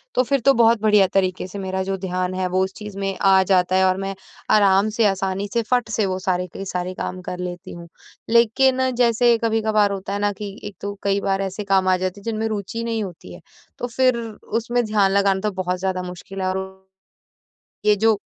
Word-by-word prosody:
तो 255 Hz, -, +4 dB
फिर 275 Hz, +2 st, +1 dB
तो 275 Hz, +3 st, +4 dB
बहुत 230 Hz, -2 st, +4 dB
बढ़िया 210 Hz, -3 st, +5 dB
तरीके 185 Hz, -1 st, 0 dB
से 200 Hz, +2 st, -8 dB
मेरा 190 Hz, 0 st, -2 dB
जो 195 Hz, 0 st, -2 dB
ध्यान 185 Hz, -1 st, -2 dB
है 185 Hz, 0 st, -1 dB
वो 185 Hz, +1 st, +1 dB
उस 190 Hz, 0 st, -4 dB
चीज़ 210 Hz, -2 st, -8 dB
में 195 Hz, -1 st, -2 dB
आ 190 Hz, -1 st, +5 dB
जाता 185 Hz, -1 st, +2 dB
है 190 Hz, 0 st, +4 dB
और 185 Hz, -, +1 dB
मैं 195 Hz, 0 st, -4 dB, 0.4 s
आराम 200 Hz, 0 st, +4 dB
से, 225 Hz, 0 st, +1 dB
आसानी 195 Hz, 0 st, 0 dB
से, 235 Hz, -, +2 dB
फट 240 Hz, +1 st, 0 dB
से 215 Hz, -1 st, 0 dB
वो 185 Hz, -1 st, -1 dB
सारे 180 Hz, -1 st, -1 dB
के 195 Hz, -, -6 dB
सारे 180 Hz, -1 st, -3 dB
काम 185 Hz, 0 st, -5 dB
कर 180 Hz, -, -5 dB
लेती 180 Hz, +1 st, -6 dB
हूँ। 170 Hz, 0 st, -10 dB, 0.4 s
लेकिन 260 Hz, +3 st, +3 dB
जैसे 235 Hz, -1 st, +3 dB
कभी-कभार 220 Hz, -2 st, +2 dB
होता 195 Hz, 0 st, -4 dB
है 200 Hz, -, -2 dB
ना, 205 Hz, 0 st, +1 dB
कि 200 Hz, 0 st, -8 dB
एक 205 Hz, -1 st, -7 dB
तो 200 Hz, 0 st, -4 dB
कई 200 Hz, 0 st, +1 dB
बार 195 Hz, 0 st, 0 dB
ऐसे 195 Hz, +2 st, -4 dB
काम 195 Hz, -1 st, +2 dB
आ 185 Hz, -, +4 dB
जाते 185 Hz, +2 st, -3 dB
हैं 200 Hz, -, -17 dB
जिनमें 225 Hz, -1 st, -2 dB
रुचि 215 Hz, +2 st, -4 dB
नहीं 225 Hz, -2 st, -2 dB
होती 175 Hz, -, -9 dB
है। 85 Hz, -, -12 dB, 0.4 s
तो 245 Hz, -, -3 dB
फिर 255 Hz, +1 st, +2 dB, 0.4 s
उसमें 240 Hz, +1 st, -1 dB
ध्यान 205 Hz, -3 st, +2 dB
लगाना 195 Hz, -1 st, +2 dB
तो 210 Hz, 0 st, -1 dB
बहुत 180 Hz, 0 st, -2 dB
ज़्यादा 185 Hz, -1 st, -1 dB
मुश्किल 180 Hz, +2 st, -8 dB
है, 185 Hz, -, 0 dB
और 190 Hz, 0 st, -5 dB, 1.0 s
ये 210 Hz, 0 st, +5 dB
जो 220 Hz, 0 st, +3 dB
195 Hz, 225 wpm, -22 LUFS, 185-220 Hz, 1.0 s, बढ़िया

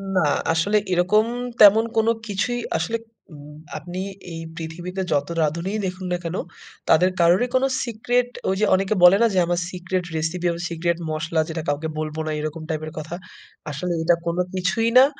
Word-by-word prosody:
না, 185 Hz, -, +3 dB, 0.3 s
আসলে 200 Hz, +6 st, +2 dB, 0.2 s
এরকম 185 Hz, +5 st, +3 dB, 0.4 s
তেমন 210 Hz, +2 st, +8 dB
কোন 225 Hz, 0 st, +3 dB, 0.2 s
কিছুই 215 Hz, +4 st, -1 dB, 0.2 s
আসলে 175 Hz, +8 st, -1 dB, 0.4 s
উম 150 Hz, 0 st, -12 dB, 0.2 s
আপনি 175 Hz, +4 st, -7 dB, 0.3 s
এই 165 Hz, -, -6 dB
পৃথিবীতে 175 Hz, +3 st, -5 dB
যত 145 Hz, 0 st, +1 dB
রাঁধুনিই 170 Hz, +7 st, -1 dB
দেখুন 185 Hz, 0 st, -4 dB
না 180 Hz, -, +1 dB
কেন, 165 Hz, +1 st, -3 dB, 0.5 s
তাদের 180 Hz, +4 st, +5 dB
কারোরই 175 Hz, +8 st, +4 dB
কোন 255 Hz, -, +3 dB, 0.2 s
সিক্রেট, 245 Hz, +1 st, 0 dB, 0.2 s
ওই 190 Hz, -, +1 dB
যে 215 Hz, -, +3 dB
অনেকে 195 Hz, +2 st, 0 dB
বলে 180 Hz, +2 st, +9 dB
না? 235 Hz, -, +6 dB
যে -, -, 0 dB
"আমার 175 Hz, 0 st, 0 dB
সিক্রেট 180 Hz, 0 st, -2 dB
রেসিপি, 160 Hz, +3 st, -2 dB
আমার 170 Hz, +1 st, -5 dB
সিক্রেট 170 Hz, 0 st, -1 dB
মসলা, 160 Hz, +1 st, -1 dB
যেটা 160 Hz, 0 st, -3 dB
কাউকে 145 Hz, +2 st, -1 dB
বলব 155 Hz, 0 st, -4 dB
না," -, -, -1 dB
এরকম 155 Hz, +1 st, -4 dB
টাইপের 155 Hz, 0 st, -3 dB
কথা। 160 Hz, +3 st, -6 dB, 0.6 s
আসলে 175 Hz, +5 st, -2 dB
এটা 170 Hz, +1 st, +4 dB
কোন 170 Hz, 0 st, -1 dB, 0.2 s
কিছুই 195 Hz, +5 st, +1 dB
না। 260 Hz, -, +9 dB
175 Hz, 175 wpm, -23 LUFS, 160-195 Hz, 0.6 s, বলে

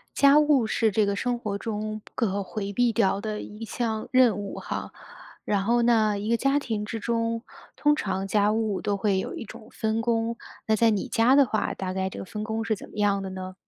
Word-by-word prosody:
家 280 Hz, +1 st, +6 dB
务 295 Hz, -6 st, +4 dB
是 220 Hz, +1 st, +1 dB
这 210 Hz, +1 st, +2 dB
个 200 Hz, -, 0 dB
生 245 Hz, +4 st, -1 dB
活 210 Hz, -4 st, -3 dB
中 215 Hz, 0 st, -4 dB
不 -, -, -19 dB
可 200 Hz, -4 st, 0 dB
回 200 Hz, +1 st, -5 dB
避 240 Hz, +3 st, +2 dB
掉 200 Hz, -3 st, +2 dB
的 215 Hz, 0 st, -4 dB
一 210 Hz, +2 st, -8 dB
项 220 Hz, 0 st, -3 dB
任 255 Hz, -4 st, +5 dB
务 200 Hz, -1 st, -5 dB
哈。 -, -, -5 dB, 0.5 s
然 200 Hz, -2 st, 0 dB
后 240 Hz, +3 st, +3 dB
呢， 220 Hz, -3 st, +3 dB
一 205 Hz, +2 st, -4 dB
个 235 Hz, -, +3 dB
家 275 Hz, +4 st, +2 dB
庭 220 Hz, -7 st, -3 dB
之 225 Hz, +1 st, -5 dB
中， 230 Hz, +1 st, -1 dB, 0.3 s
通 295 Hz, 0 st, +3 dB
常 195 Hz, -6 st, -2 dB
家 205 Hz, +1 st, +2 dB
务 220 Hz, -3 st, -1 dB
都 205 Hz, -1 st, 0 dB
会 195 Hz, -1 st, +1 dB
有 -, -, -4 dB
一 -, -, -6 dB
种 215 Hz, 0 st, -12 dB
分 220 Hz, +1 st, -1 dB
工， 230 Hz, 0 st, 0 dB, 0.3 s
那 220 Hz, -, +3 dB
在 230 Hz, +1 st, +4 dB
你 205 Hz, -3 st, -1 dB
家 230 Hz, +3 st, +4 dB
的 280 Hz, -1 st, +6 dB
话， 215 Hz, -1 st, -1 dB
大 185 Hz, -1 st, -4 dB
概 190 Hz, 0 st, -1 dB
这 -, -, -8 dB
个 -, -, -5 dB
分 210 Hz, +3 st, -5 dB
工 220 Hz, +1 st, -2 dB
是 225 Hz, -1 st, 0 dB
怎 -, -, -10 dB
么 -, -, -14 dB
样 200 Hz, -1 st, +2 dB
的 190 Hz, -, -5 dB
呢？ 185 Hz, 0 st, -7 dB
215 Hz, 250 characters per minute, -26 LUFS, 200-230 Hz, 0.5 s, 家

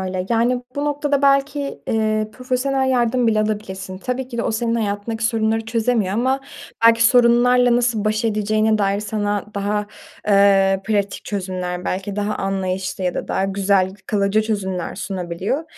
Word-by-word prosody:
öyle, 185 Hz, -1 st, -3 dB
yani, 240 Hz, +2 st, +1 dB
bu 285 Hz, -, -1 dB
noktada 290 Hz, -1 st, 0 dB
belki, 275 Hz, 0 st, +1 dB
eee, 215 Hz, -1 st, 0 dB
profesyonel 260 Hz, +2 st, -1 dB
yardım 245 Hz, -1 st, +2 dB
bile 215 Hz, -1 st, +3 dB
alabilirsin. 190 Hz, -3 st, -4 dB
Tabii 255 Hz, +3 st, -3 dB
ki 235 Hz, -, -6 dB
de -, -, +1 dB
o -, -, -1 dB
senin 230 Hz, +1 st, -1 dB
hayatındaki 220 Hz, +1 st, -2 dB
sorunları 225 Hz, -1 st, +1 dB
çözemiyor 225 Hz, -3 st, 0 dB
ama 260 Hz, +4 st, +1 dB, 0.5 s
belki 230 Hz, 0 st, +5 dB
sorunlarla 245 Hz, 0 st, +5 dB
nasıl 240 Hz, -3 st, 0 dB
baş 215 Hz, +2 st, 0 dB
edeceğine 215 Hz, 0 st, +1 dB
dair 200 Hz, 0 st, +1 dB
sana 205 Hz, -1 st, -2 dB
daha, 205 Hz, +1 st, -1 dB, 0.4 s
eee, 195 Hz, -1 st, +4 dB
pratik 205 Hz, -2 st, -1 dB
çözümler, 185 Hz, -2 st, -4 dB
belki 195 Hz, +2 st, -3 dB
daha 210 Hz, 0 st, -1 dB
anlayışlı 190 Hz, -1 st, -3 dB
ya 180 Hz, -, 0 dB
da -, -, -4 dB
daha 190 Hz, -, 0 dB
güzel, 195 Hz, -1 st, +1 dB
kalıcı 205 Hz, +1 st, +1 dB
çözümler 190 Hz, -5 st, -3 dB
sunabiliyor. 190 Hz, -, -3 dB
215 Hz, 150 wpm, -20 LUFS, 195-240 Hz, 0.5 s, belki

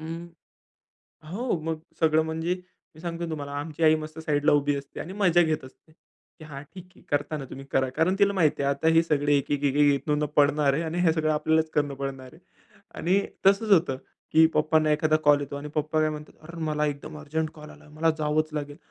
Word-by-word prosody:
हं. 165 Hz, +2 st, -6 dB, 1.1 s
हो, 230 Hz, -4 st, -1 dB
मग 160 Hz, 0 st, -3 dB, 0.2 s
सगळं 160 Hz, -1 st, +4 dB
म्हणजे 160 Hz, +2 st, -2 dB, 0.4 s
मी 155 Hz, -, -14 dB
सांगतोय 170 Hz, 0 st, -4 dB
तुम्हाला, 145 Hz, -2 st, -5 dB
आमची 155 Hz, +2 st, -5 dB
आई 155 Hz, 0 st, +6 dB
मस्त 155 Hz, +1 st, -8 dB
साइडला 150 Hz, -1 st, +1 dB
उभी 145 Hz, 0 st, +2 dB
असते 140 Hz, -, -8 dB
आणि 180 Hz, -, -6 dB
मजा 175 Hz, -4 st, +4 dB
घेत 155 Hz, -4 st, -1 dB
असते, 145 Hz, +4 st, -17 dB
की 160 Hz, 0 st, -21 dB
"हां, 140 Hz, -2 st, -8 dB
ठीक 185 Hz, -1 st, -9 dB
आहे, -, -, -19 dB
करताना 145 Hz, 0 st, -1 dB
तुम्ही, 135 Hz, -, -8 dB
करा." 130 Hz, -1 st, +1 dB
कारण 165 Hz, +4 st, +2 dB
तिला 200 Hz, 0 st, +4 dB
माहिती 155 Hz, -6 st, +1 dB
आहे, 140 Hz, -, +2 dB
आता 160 Hz, +3 st, 0 dB
हे 165 Hz, -, +6 dB
सगळे 145 Hz, -2 st, +2 dB
एक, 140 Hz, -, -2 dB
एक, 145 Hz, 0 st, -1 dB
एक, 140 Hz, 0 st, +1 dB
एक 145 Hz, +1 st, +2 dB
पडणार 145 Hz, -1 st, +4 dB
आहे 160 Hz, -, -1 dB
आणि 165 Hz, +2 st, -3 dB
हे 165 Hz, -2 st, +4 dB
सगळं 155 Hz, -1 st, 0 dB
आपल्यालाच 160 Hz, +1 st, +1 dB
करणं 145 Hz, -2 st, 0 dB
पडणार 135 Hz, -1 st, -6 dB
आहे. -, -, -17 dB, 0.5 s
आणि 190 Hz, +4 st, +1 dB, 0.3 s
तसंच 200 Hz, +2 st, +4 dB
होतं, 160 Hz, -7 st, +4 dB, 0.4 s
की 160 Hz, +1 st, +7 dB
पप्पांना 155 Hz, 0 st, +2 dB
एखादा 155 Hz, +1 st, +2 dB
कॉल 145 Hz, -1 st, +5 dB
येतो 140 Hz, 0 st, -5 dB
आणि 145 Hz, +1 st, -6 dB
पप्पा 155 Hz, +1 st, 0 dB
काय 155 Hz, 0 st, +2 dB
म्हणतात, 150 Hz, 0 st, -8 dB
"अर्र, 170 Hz, +2 st, -10 dB
मला 150 Hz, 0 st, 0 dB
एकदम 150 Hz, +1 st, -5 dB
अर्जंट 155 Hz, +1 st, -3 dB
कॉल 150 Hz, -1 st, -11 dB
आला, -, -, -16 dB
मला 160 Hz, +2 st, +1 dB
जावंच 155 Hz, +1 st, +1 dB
लागेल." 145 Hz, -1 st, -5 dB
155 Hz, 210 wpm, -26 LUFS, 145-160 Hz, 1.1 s, की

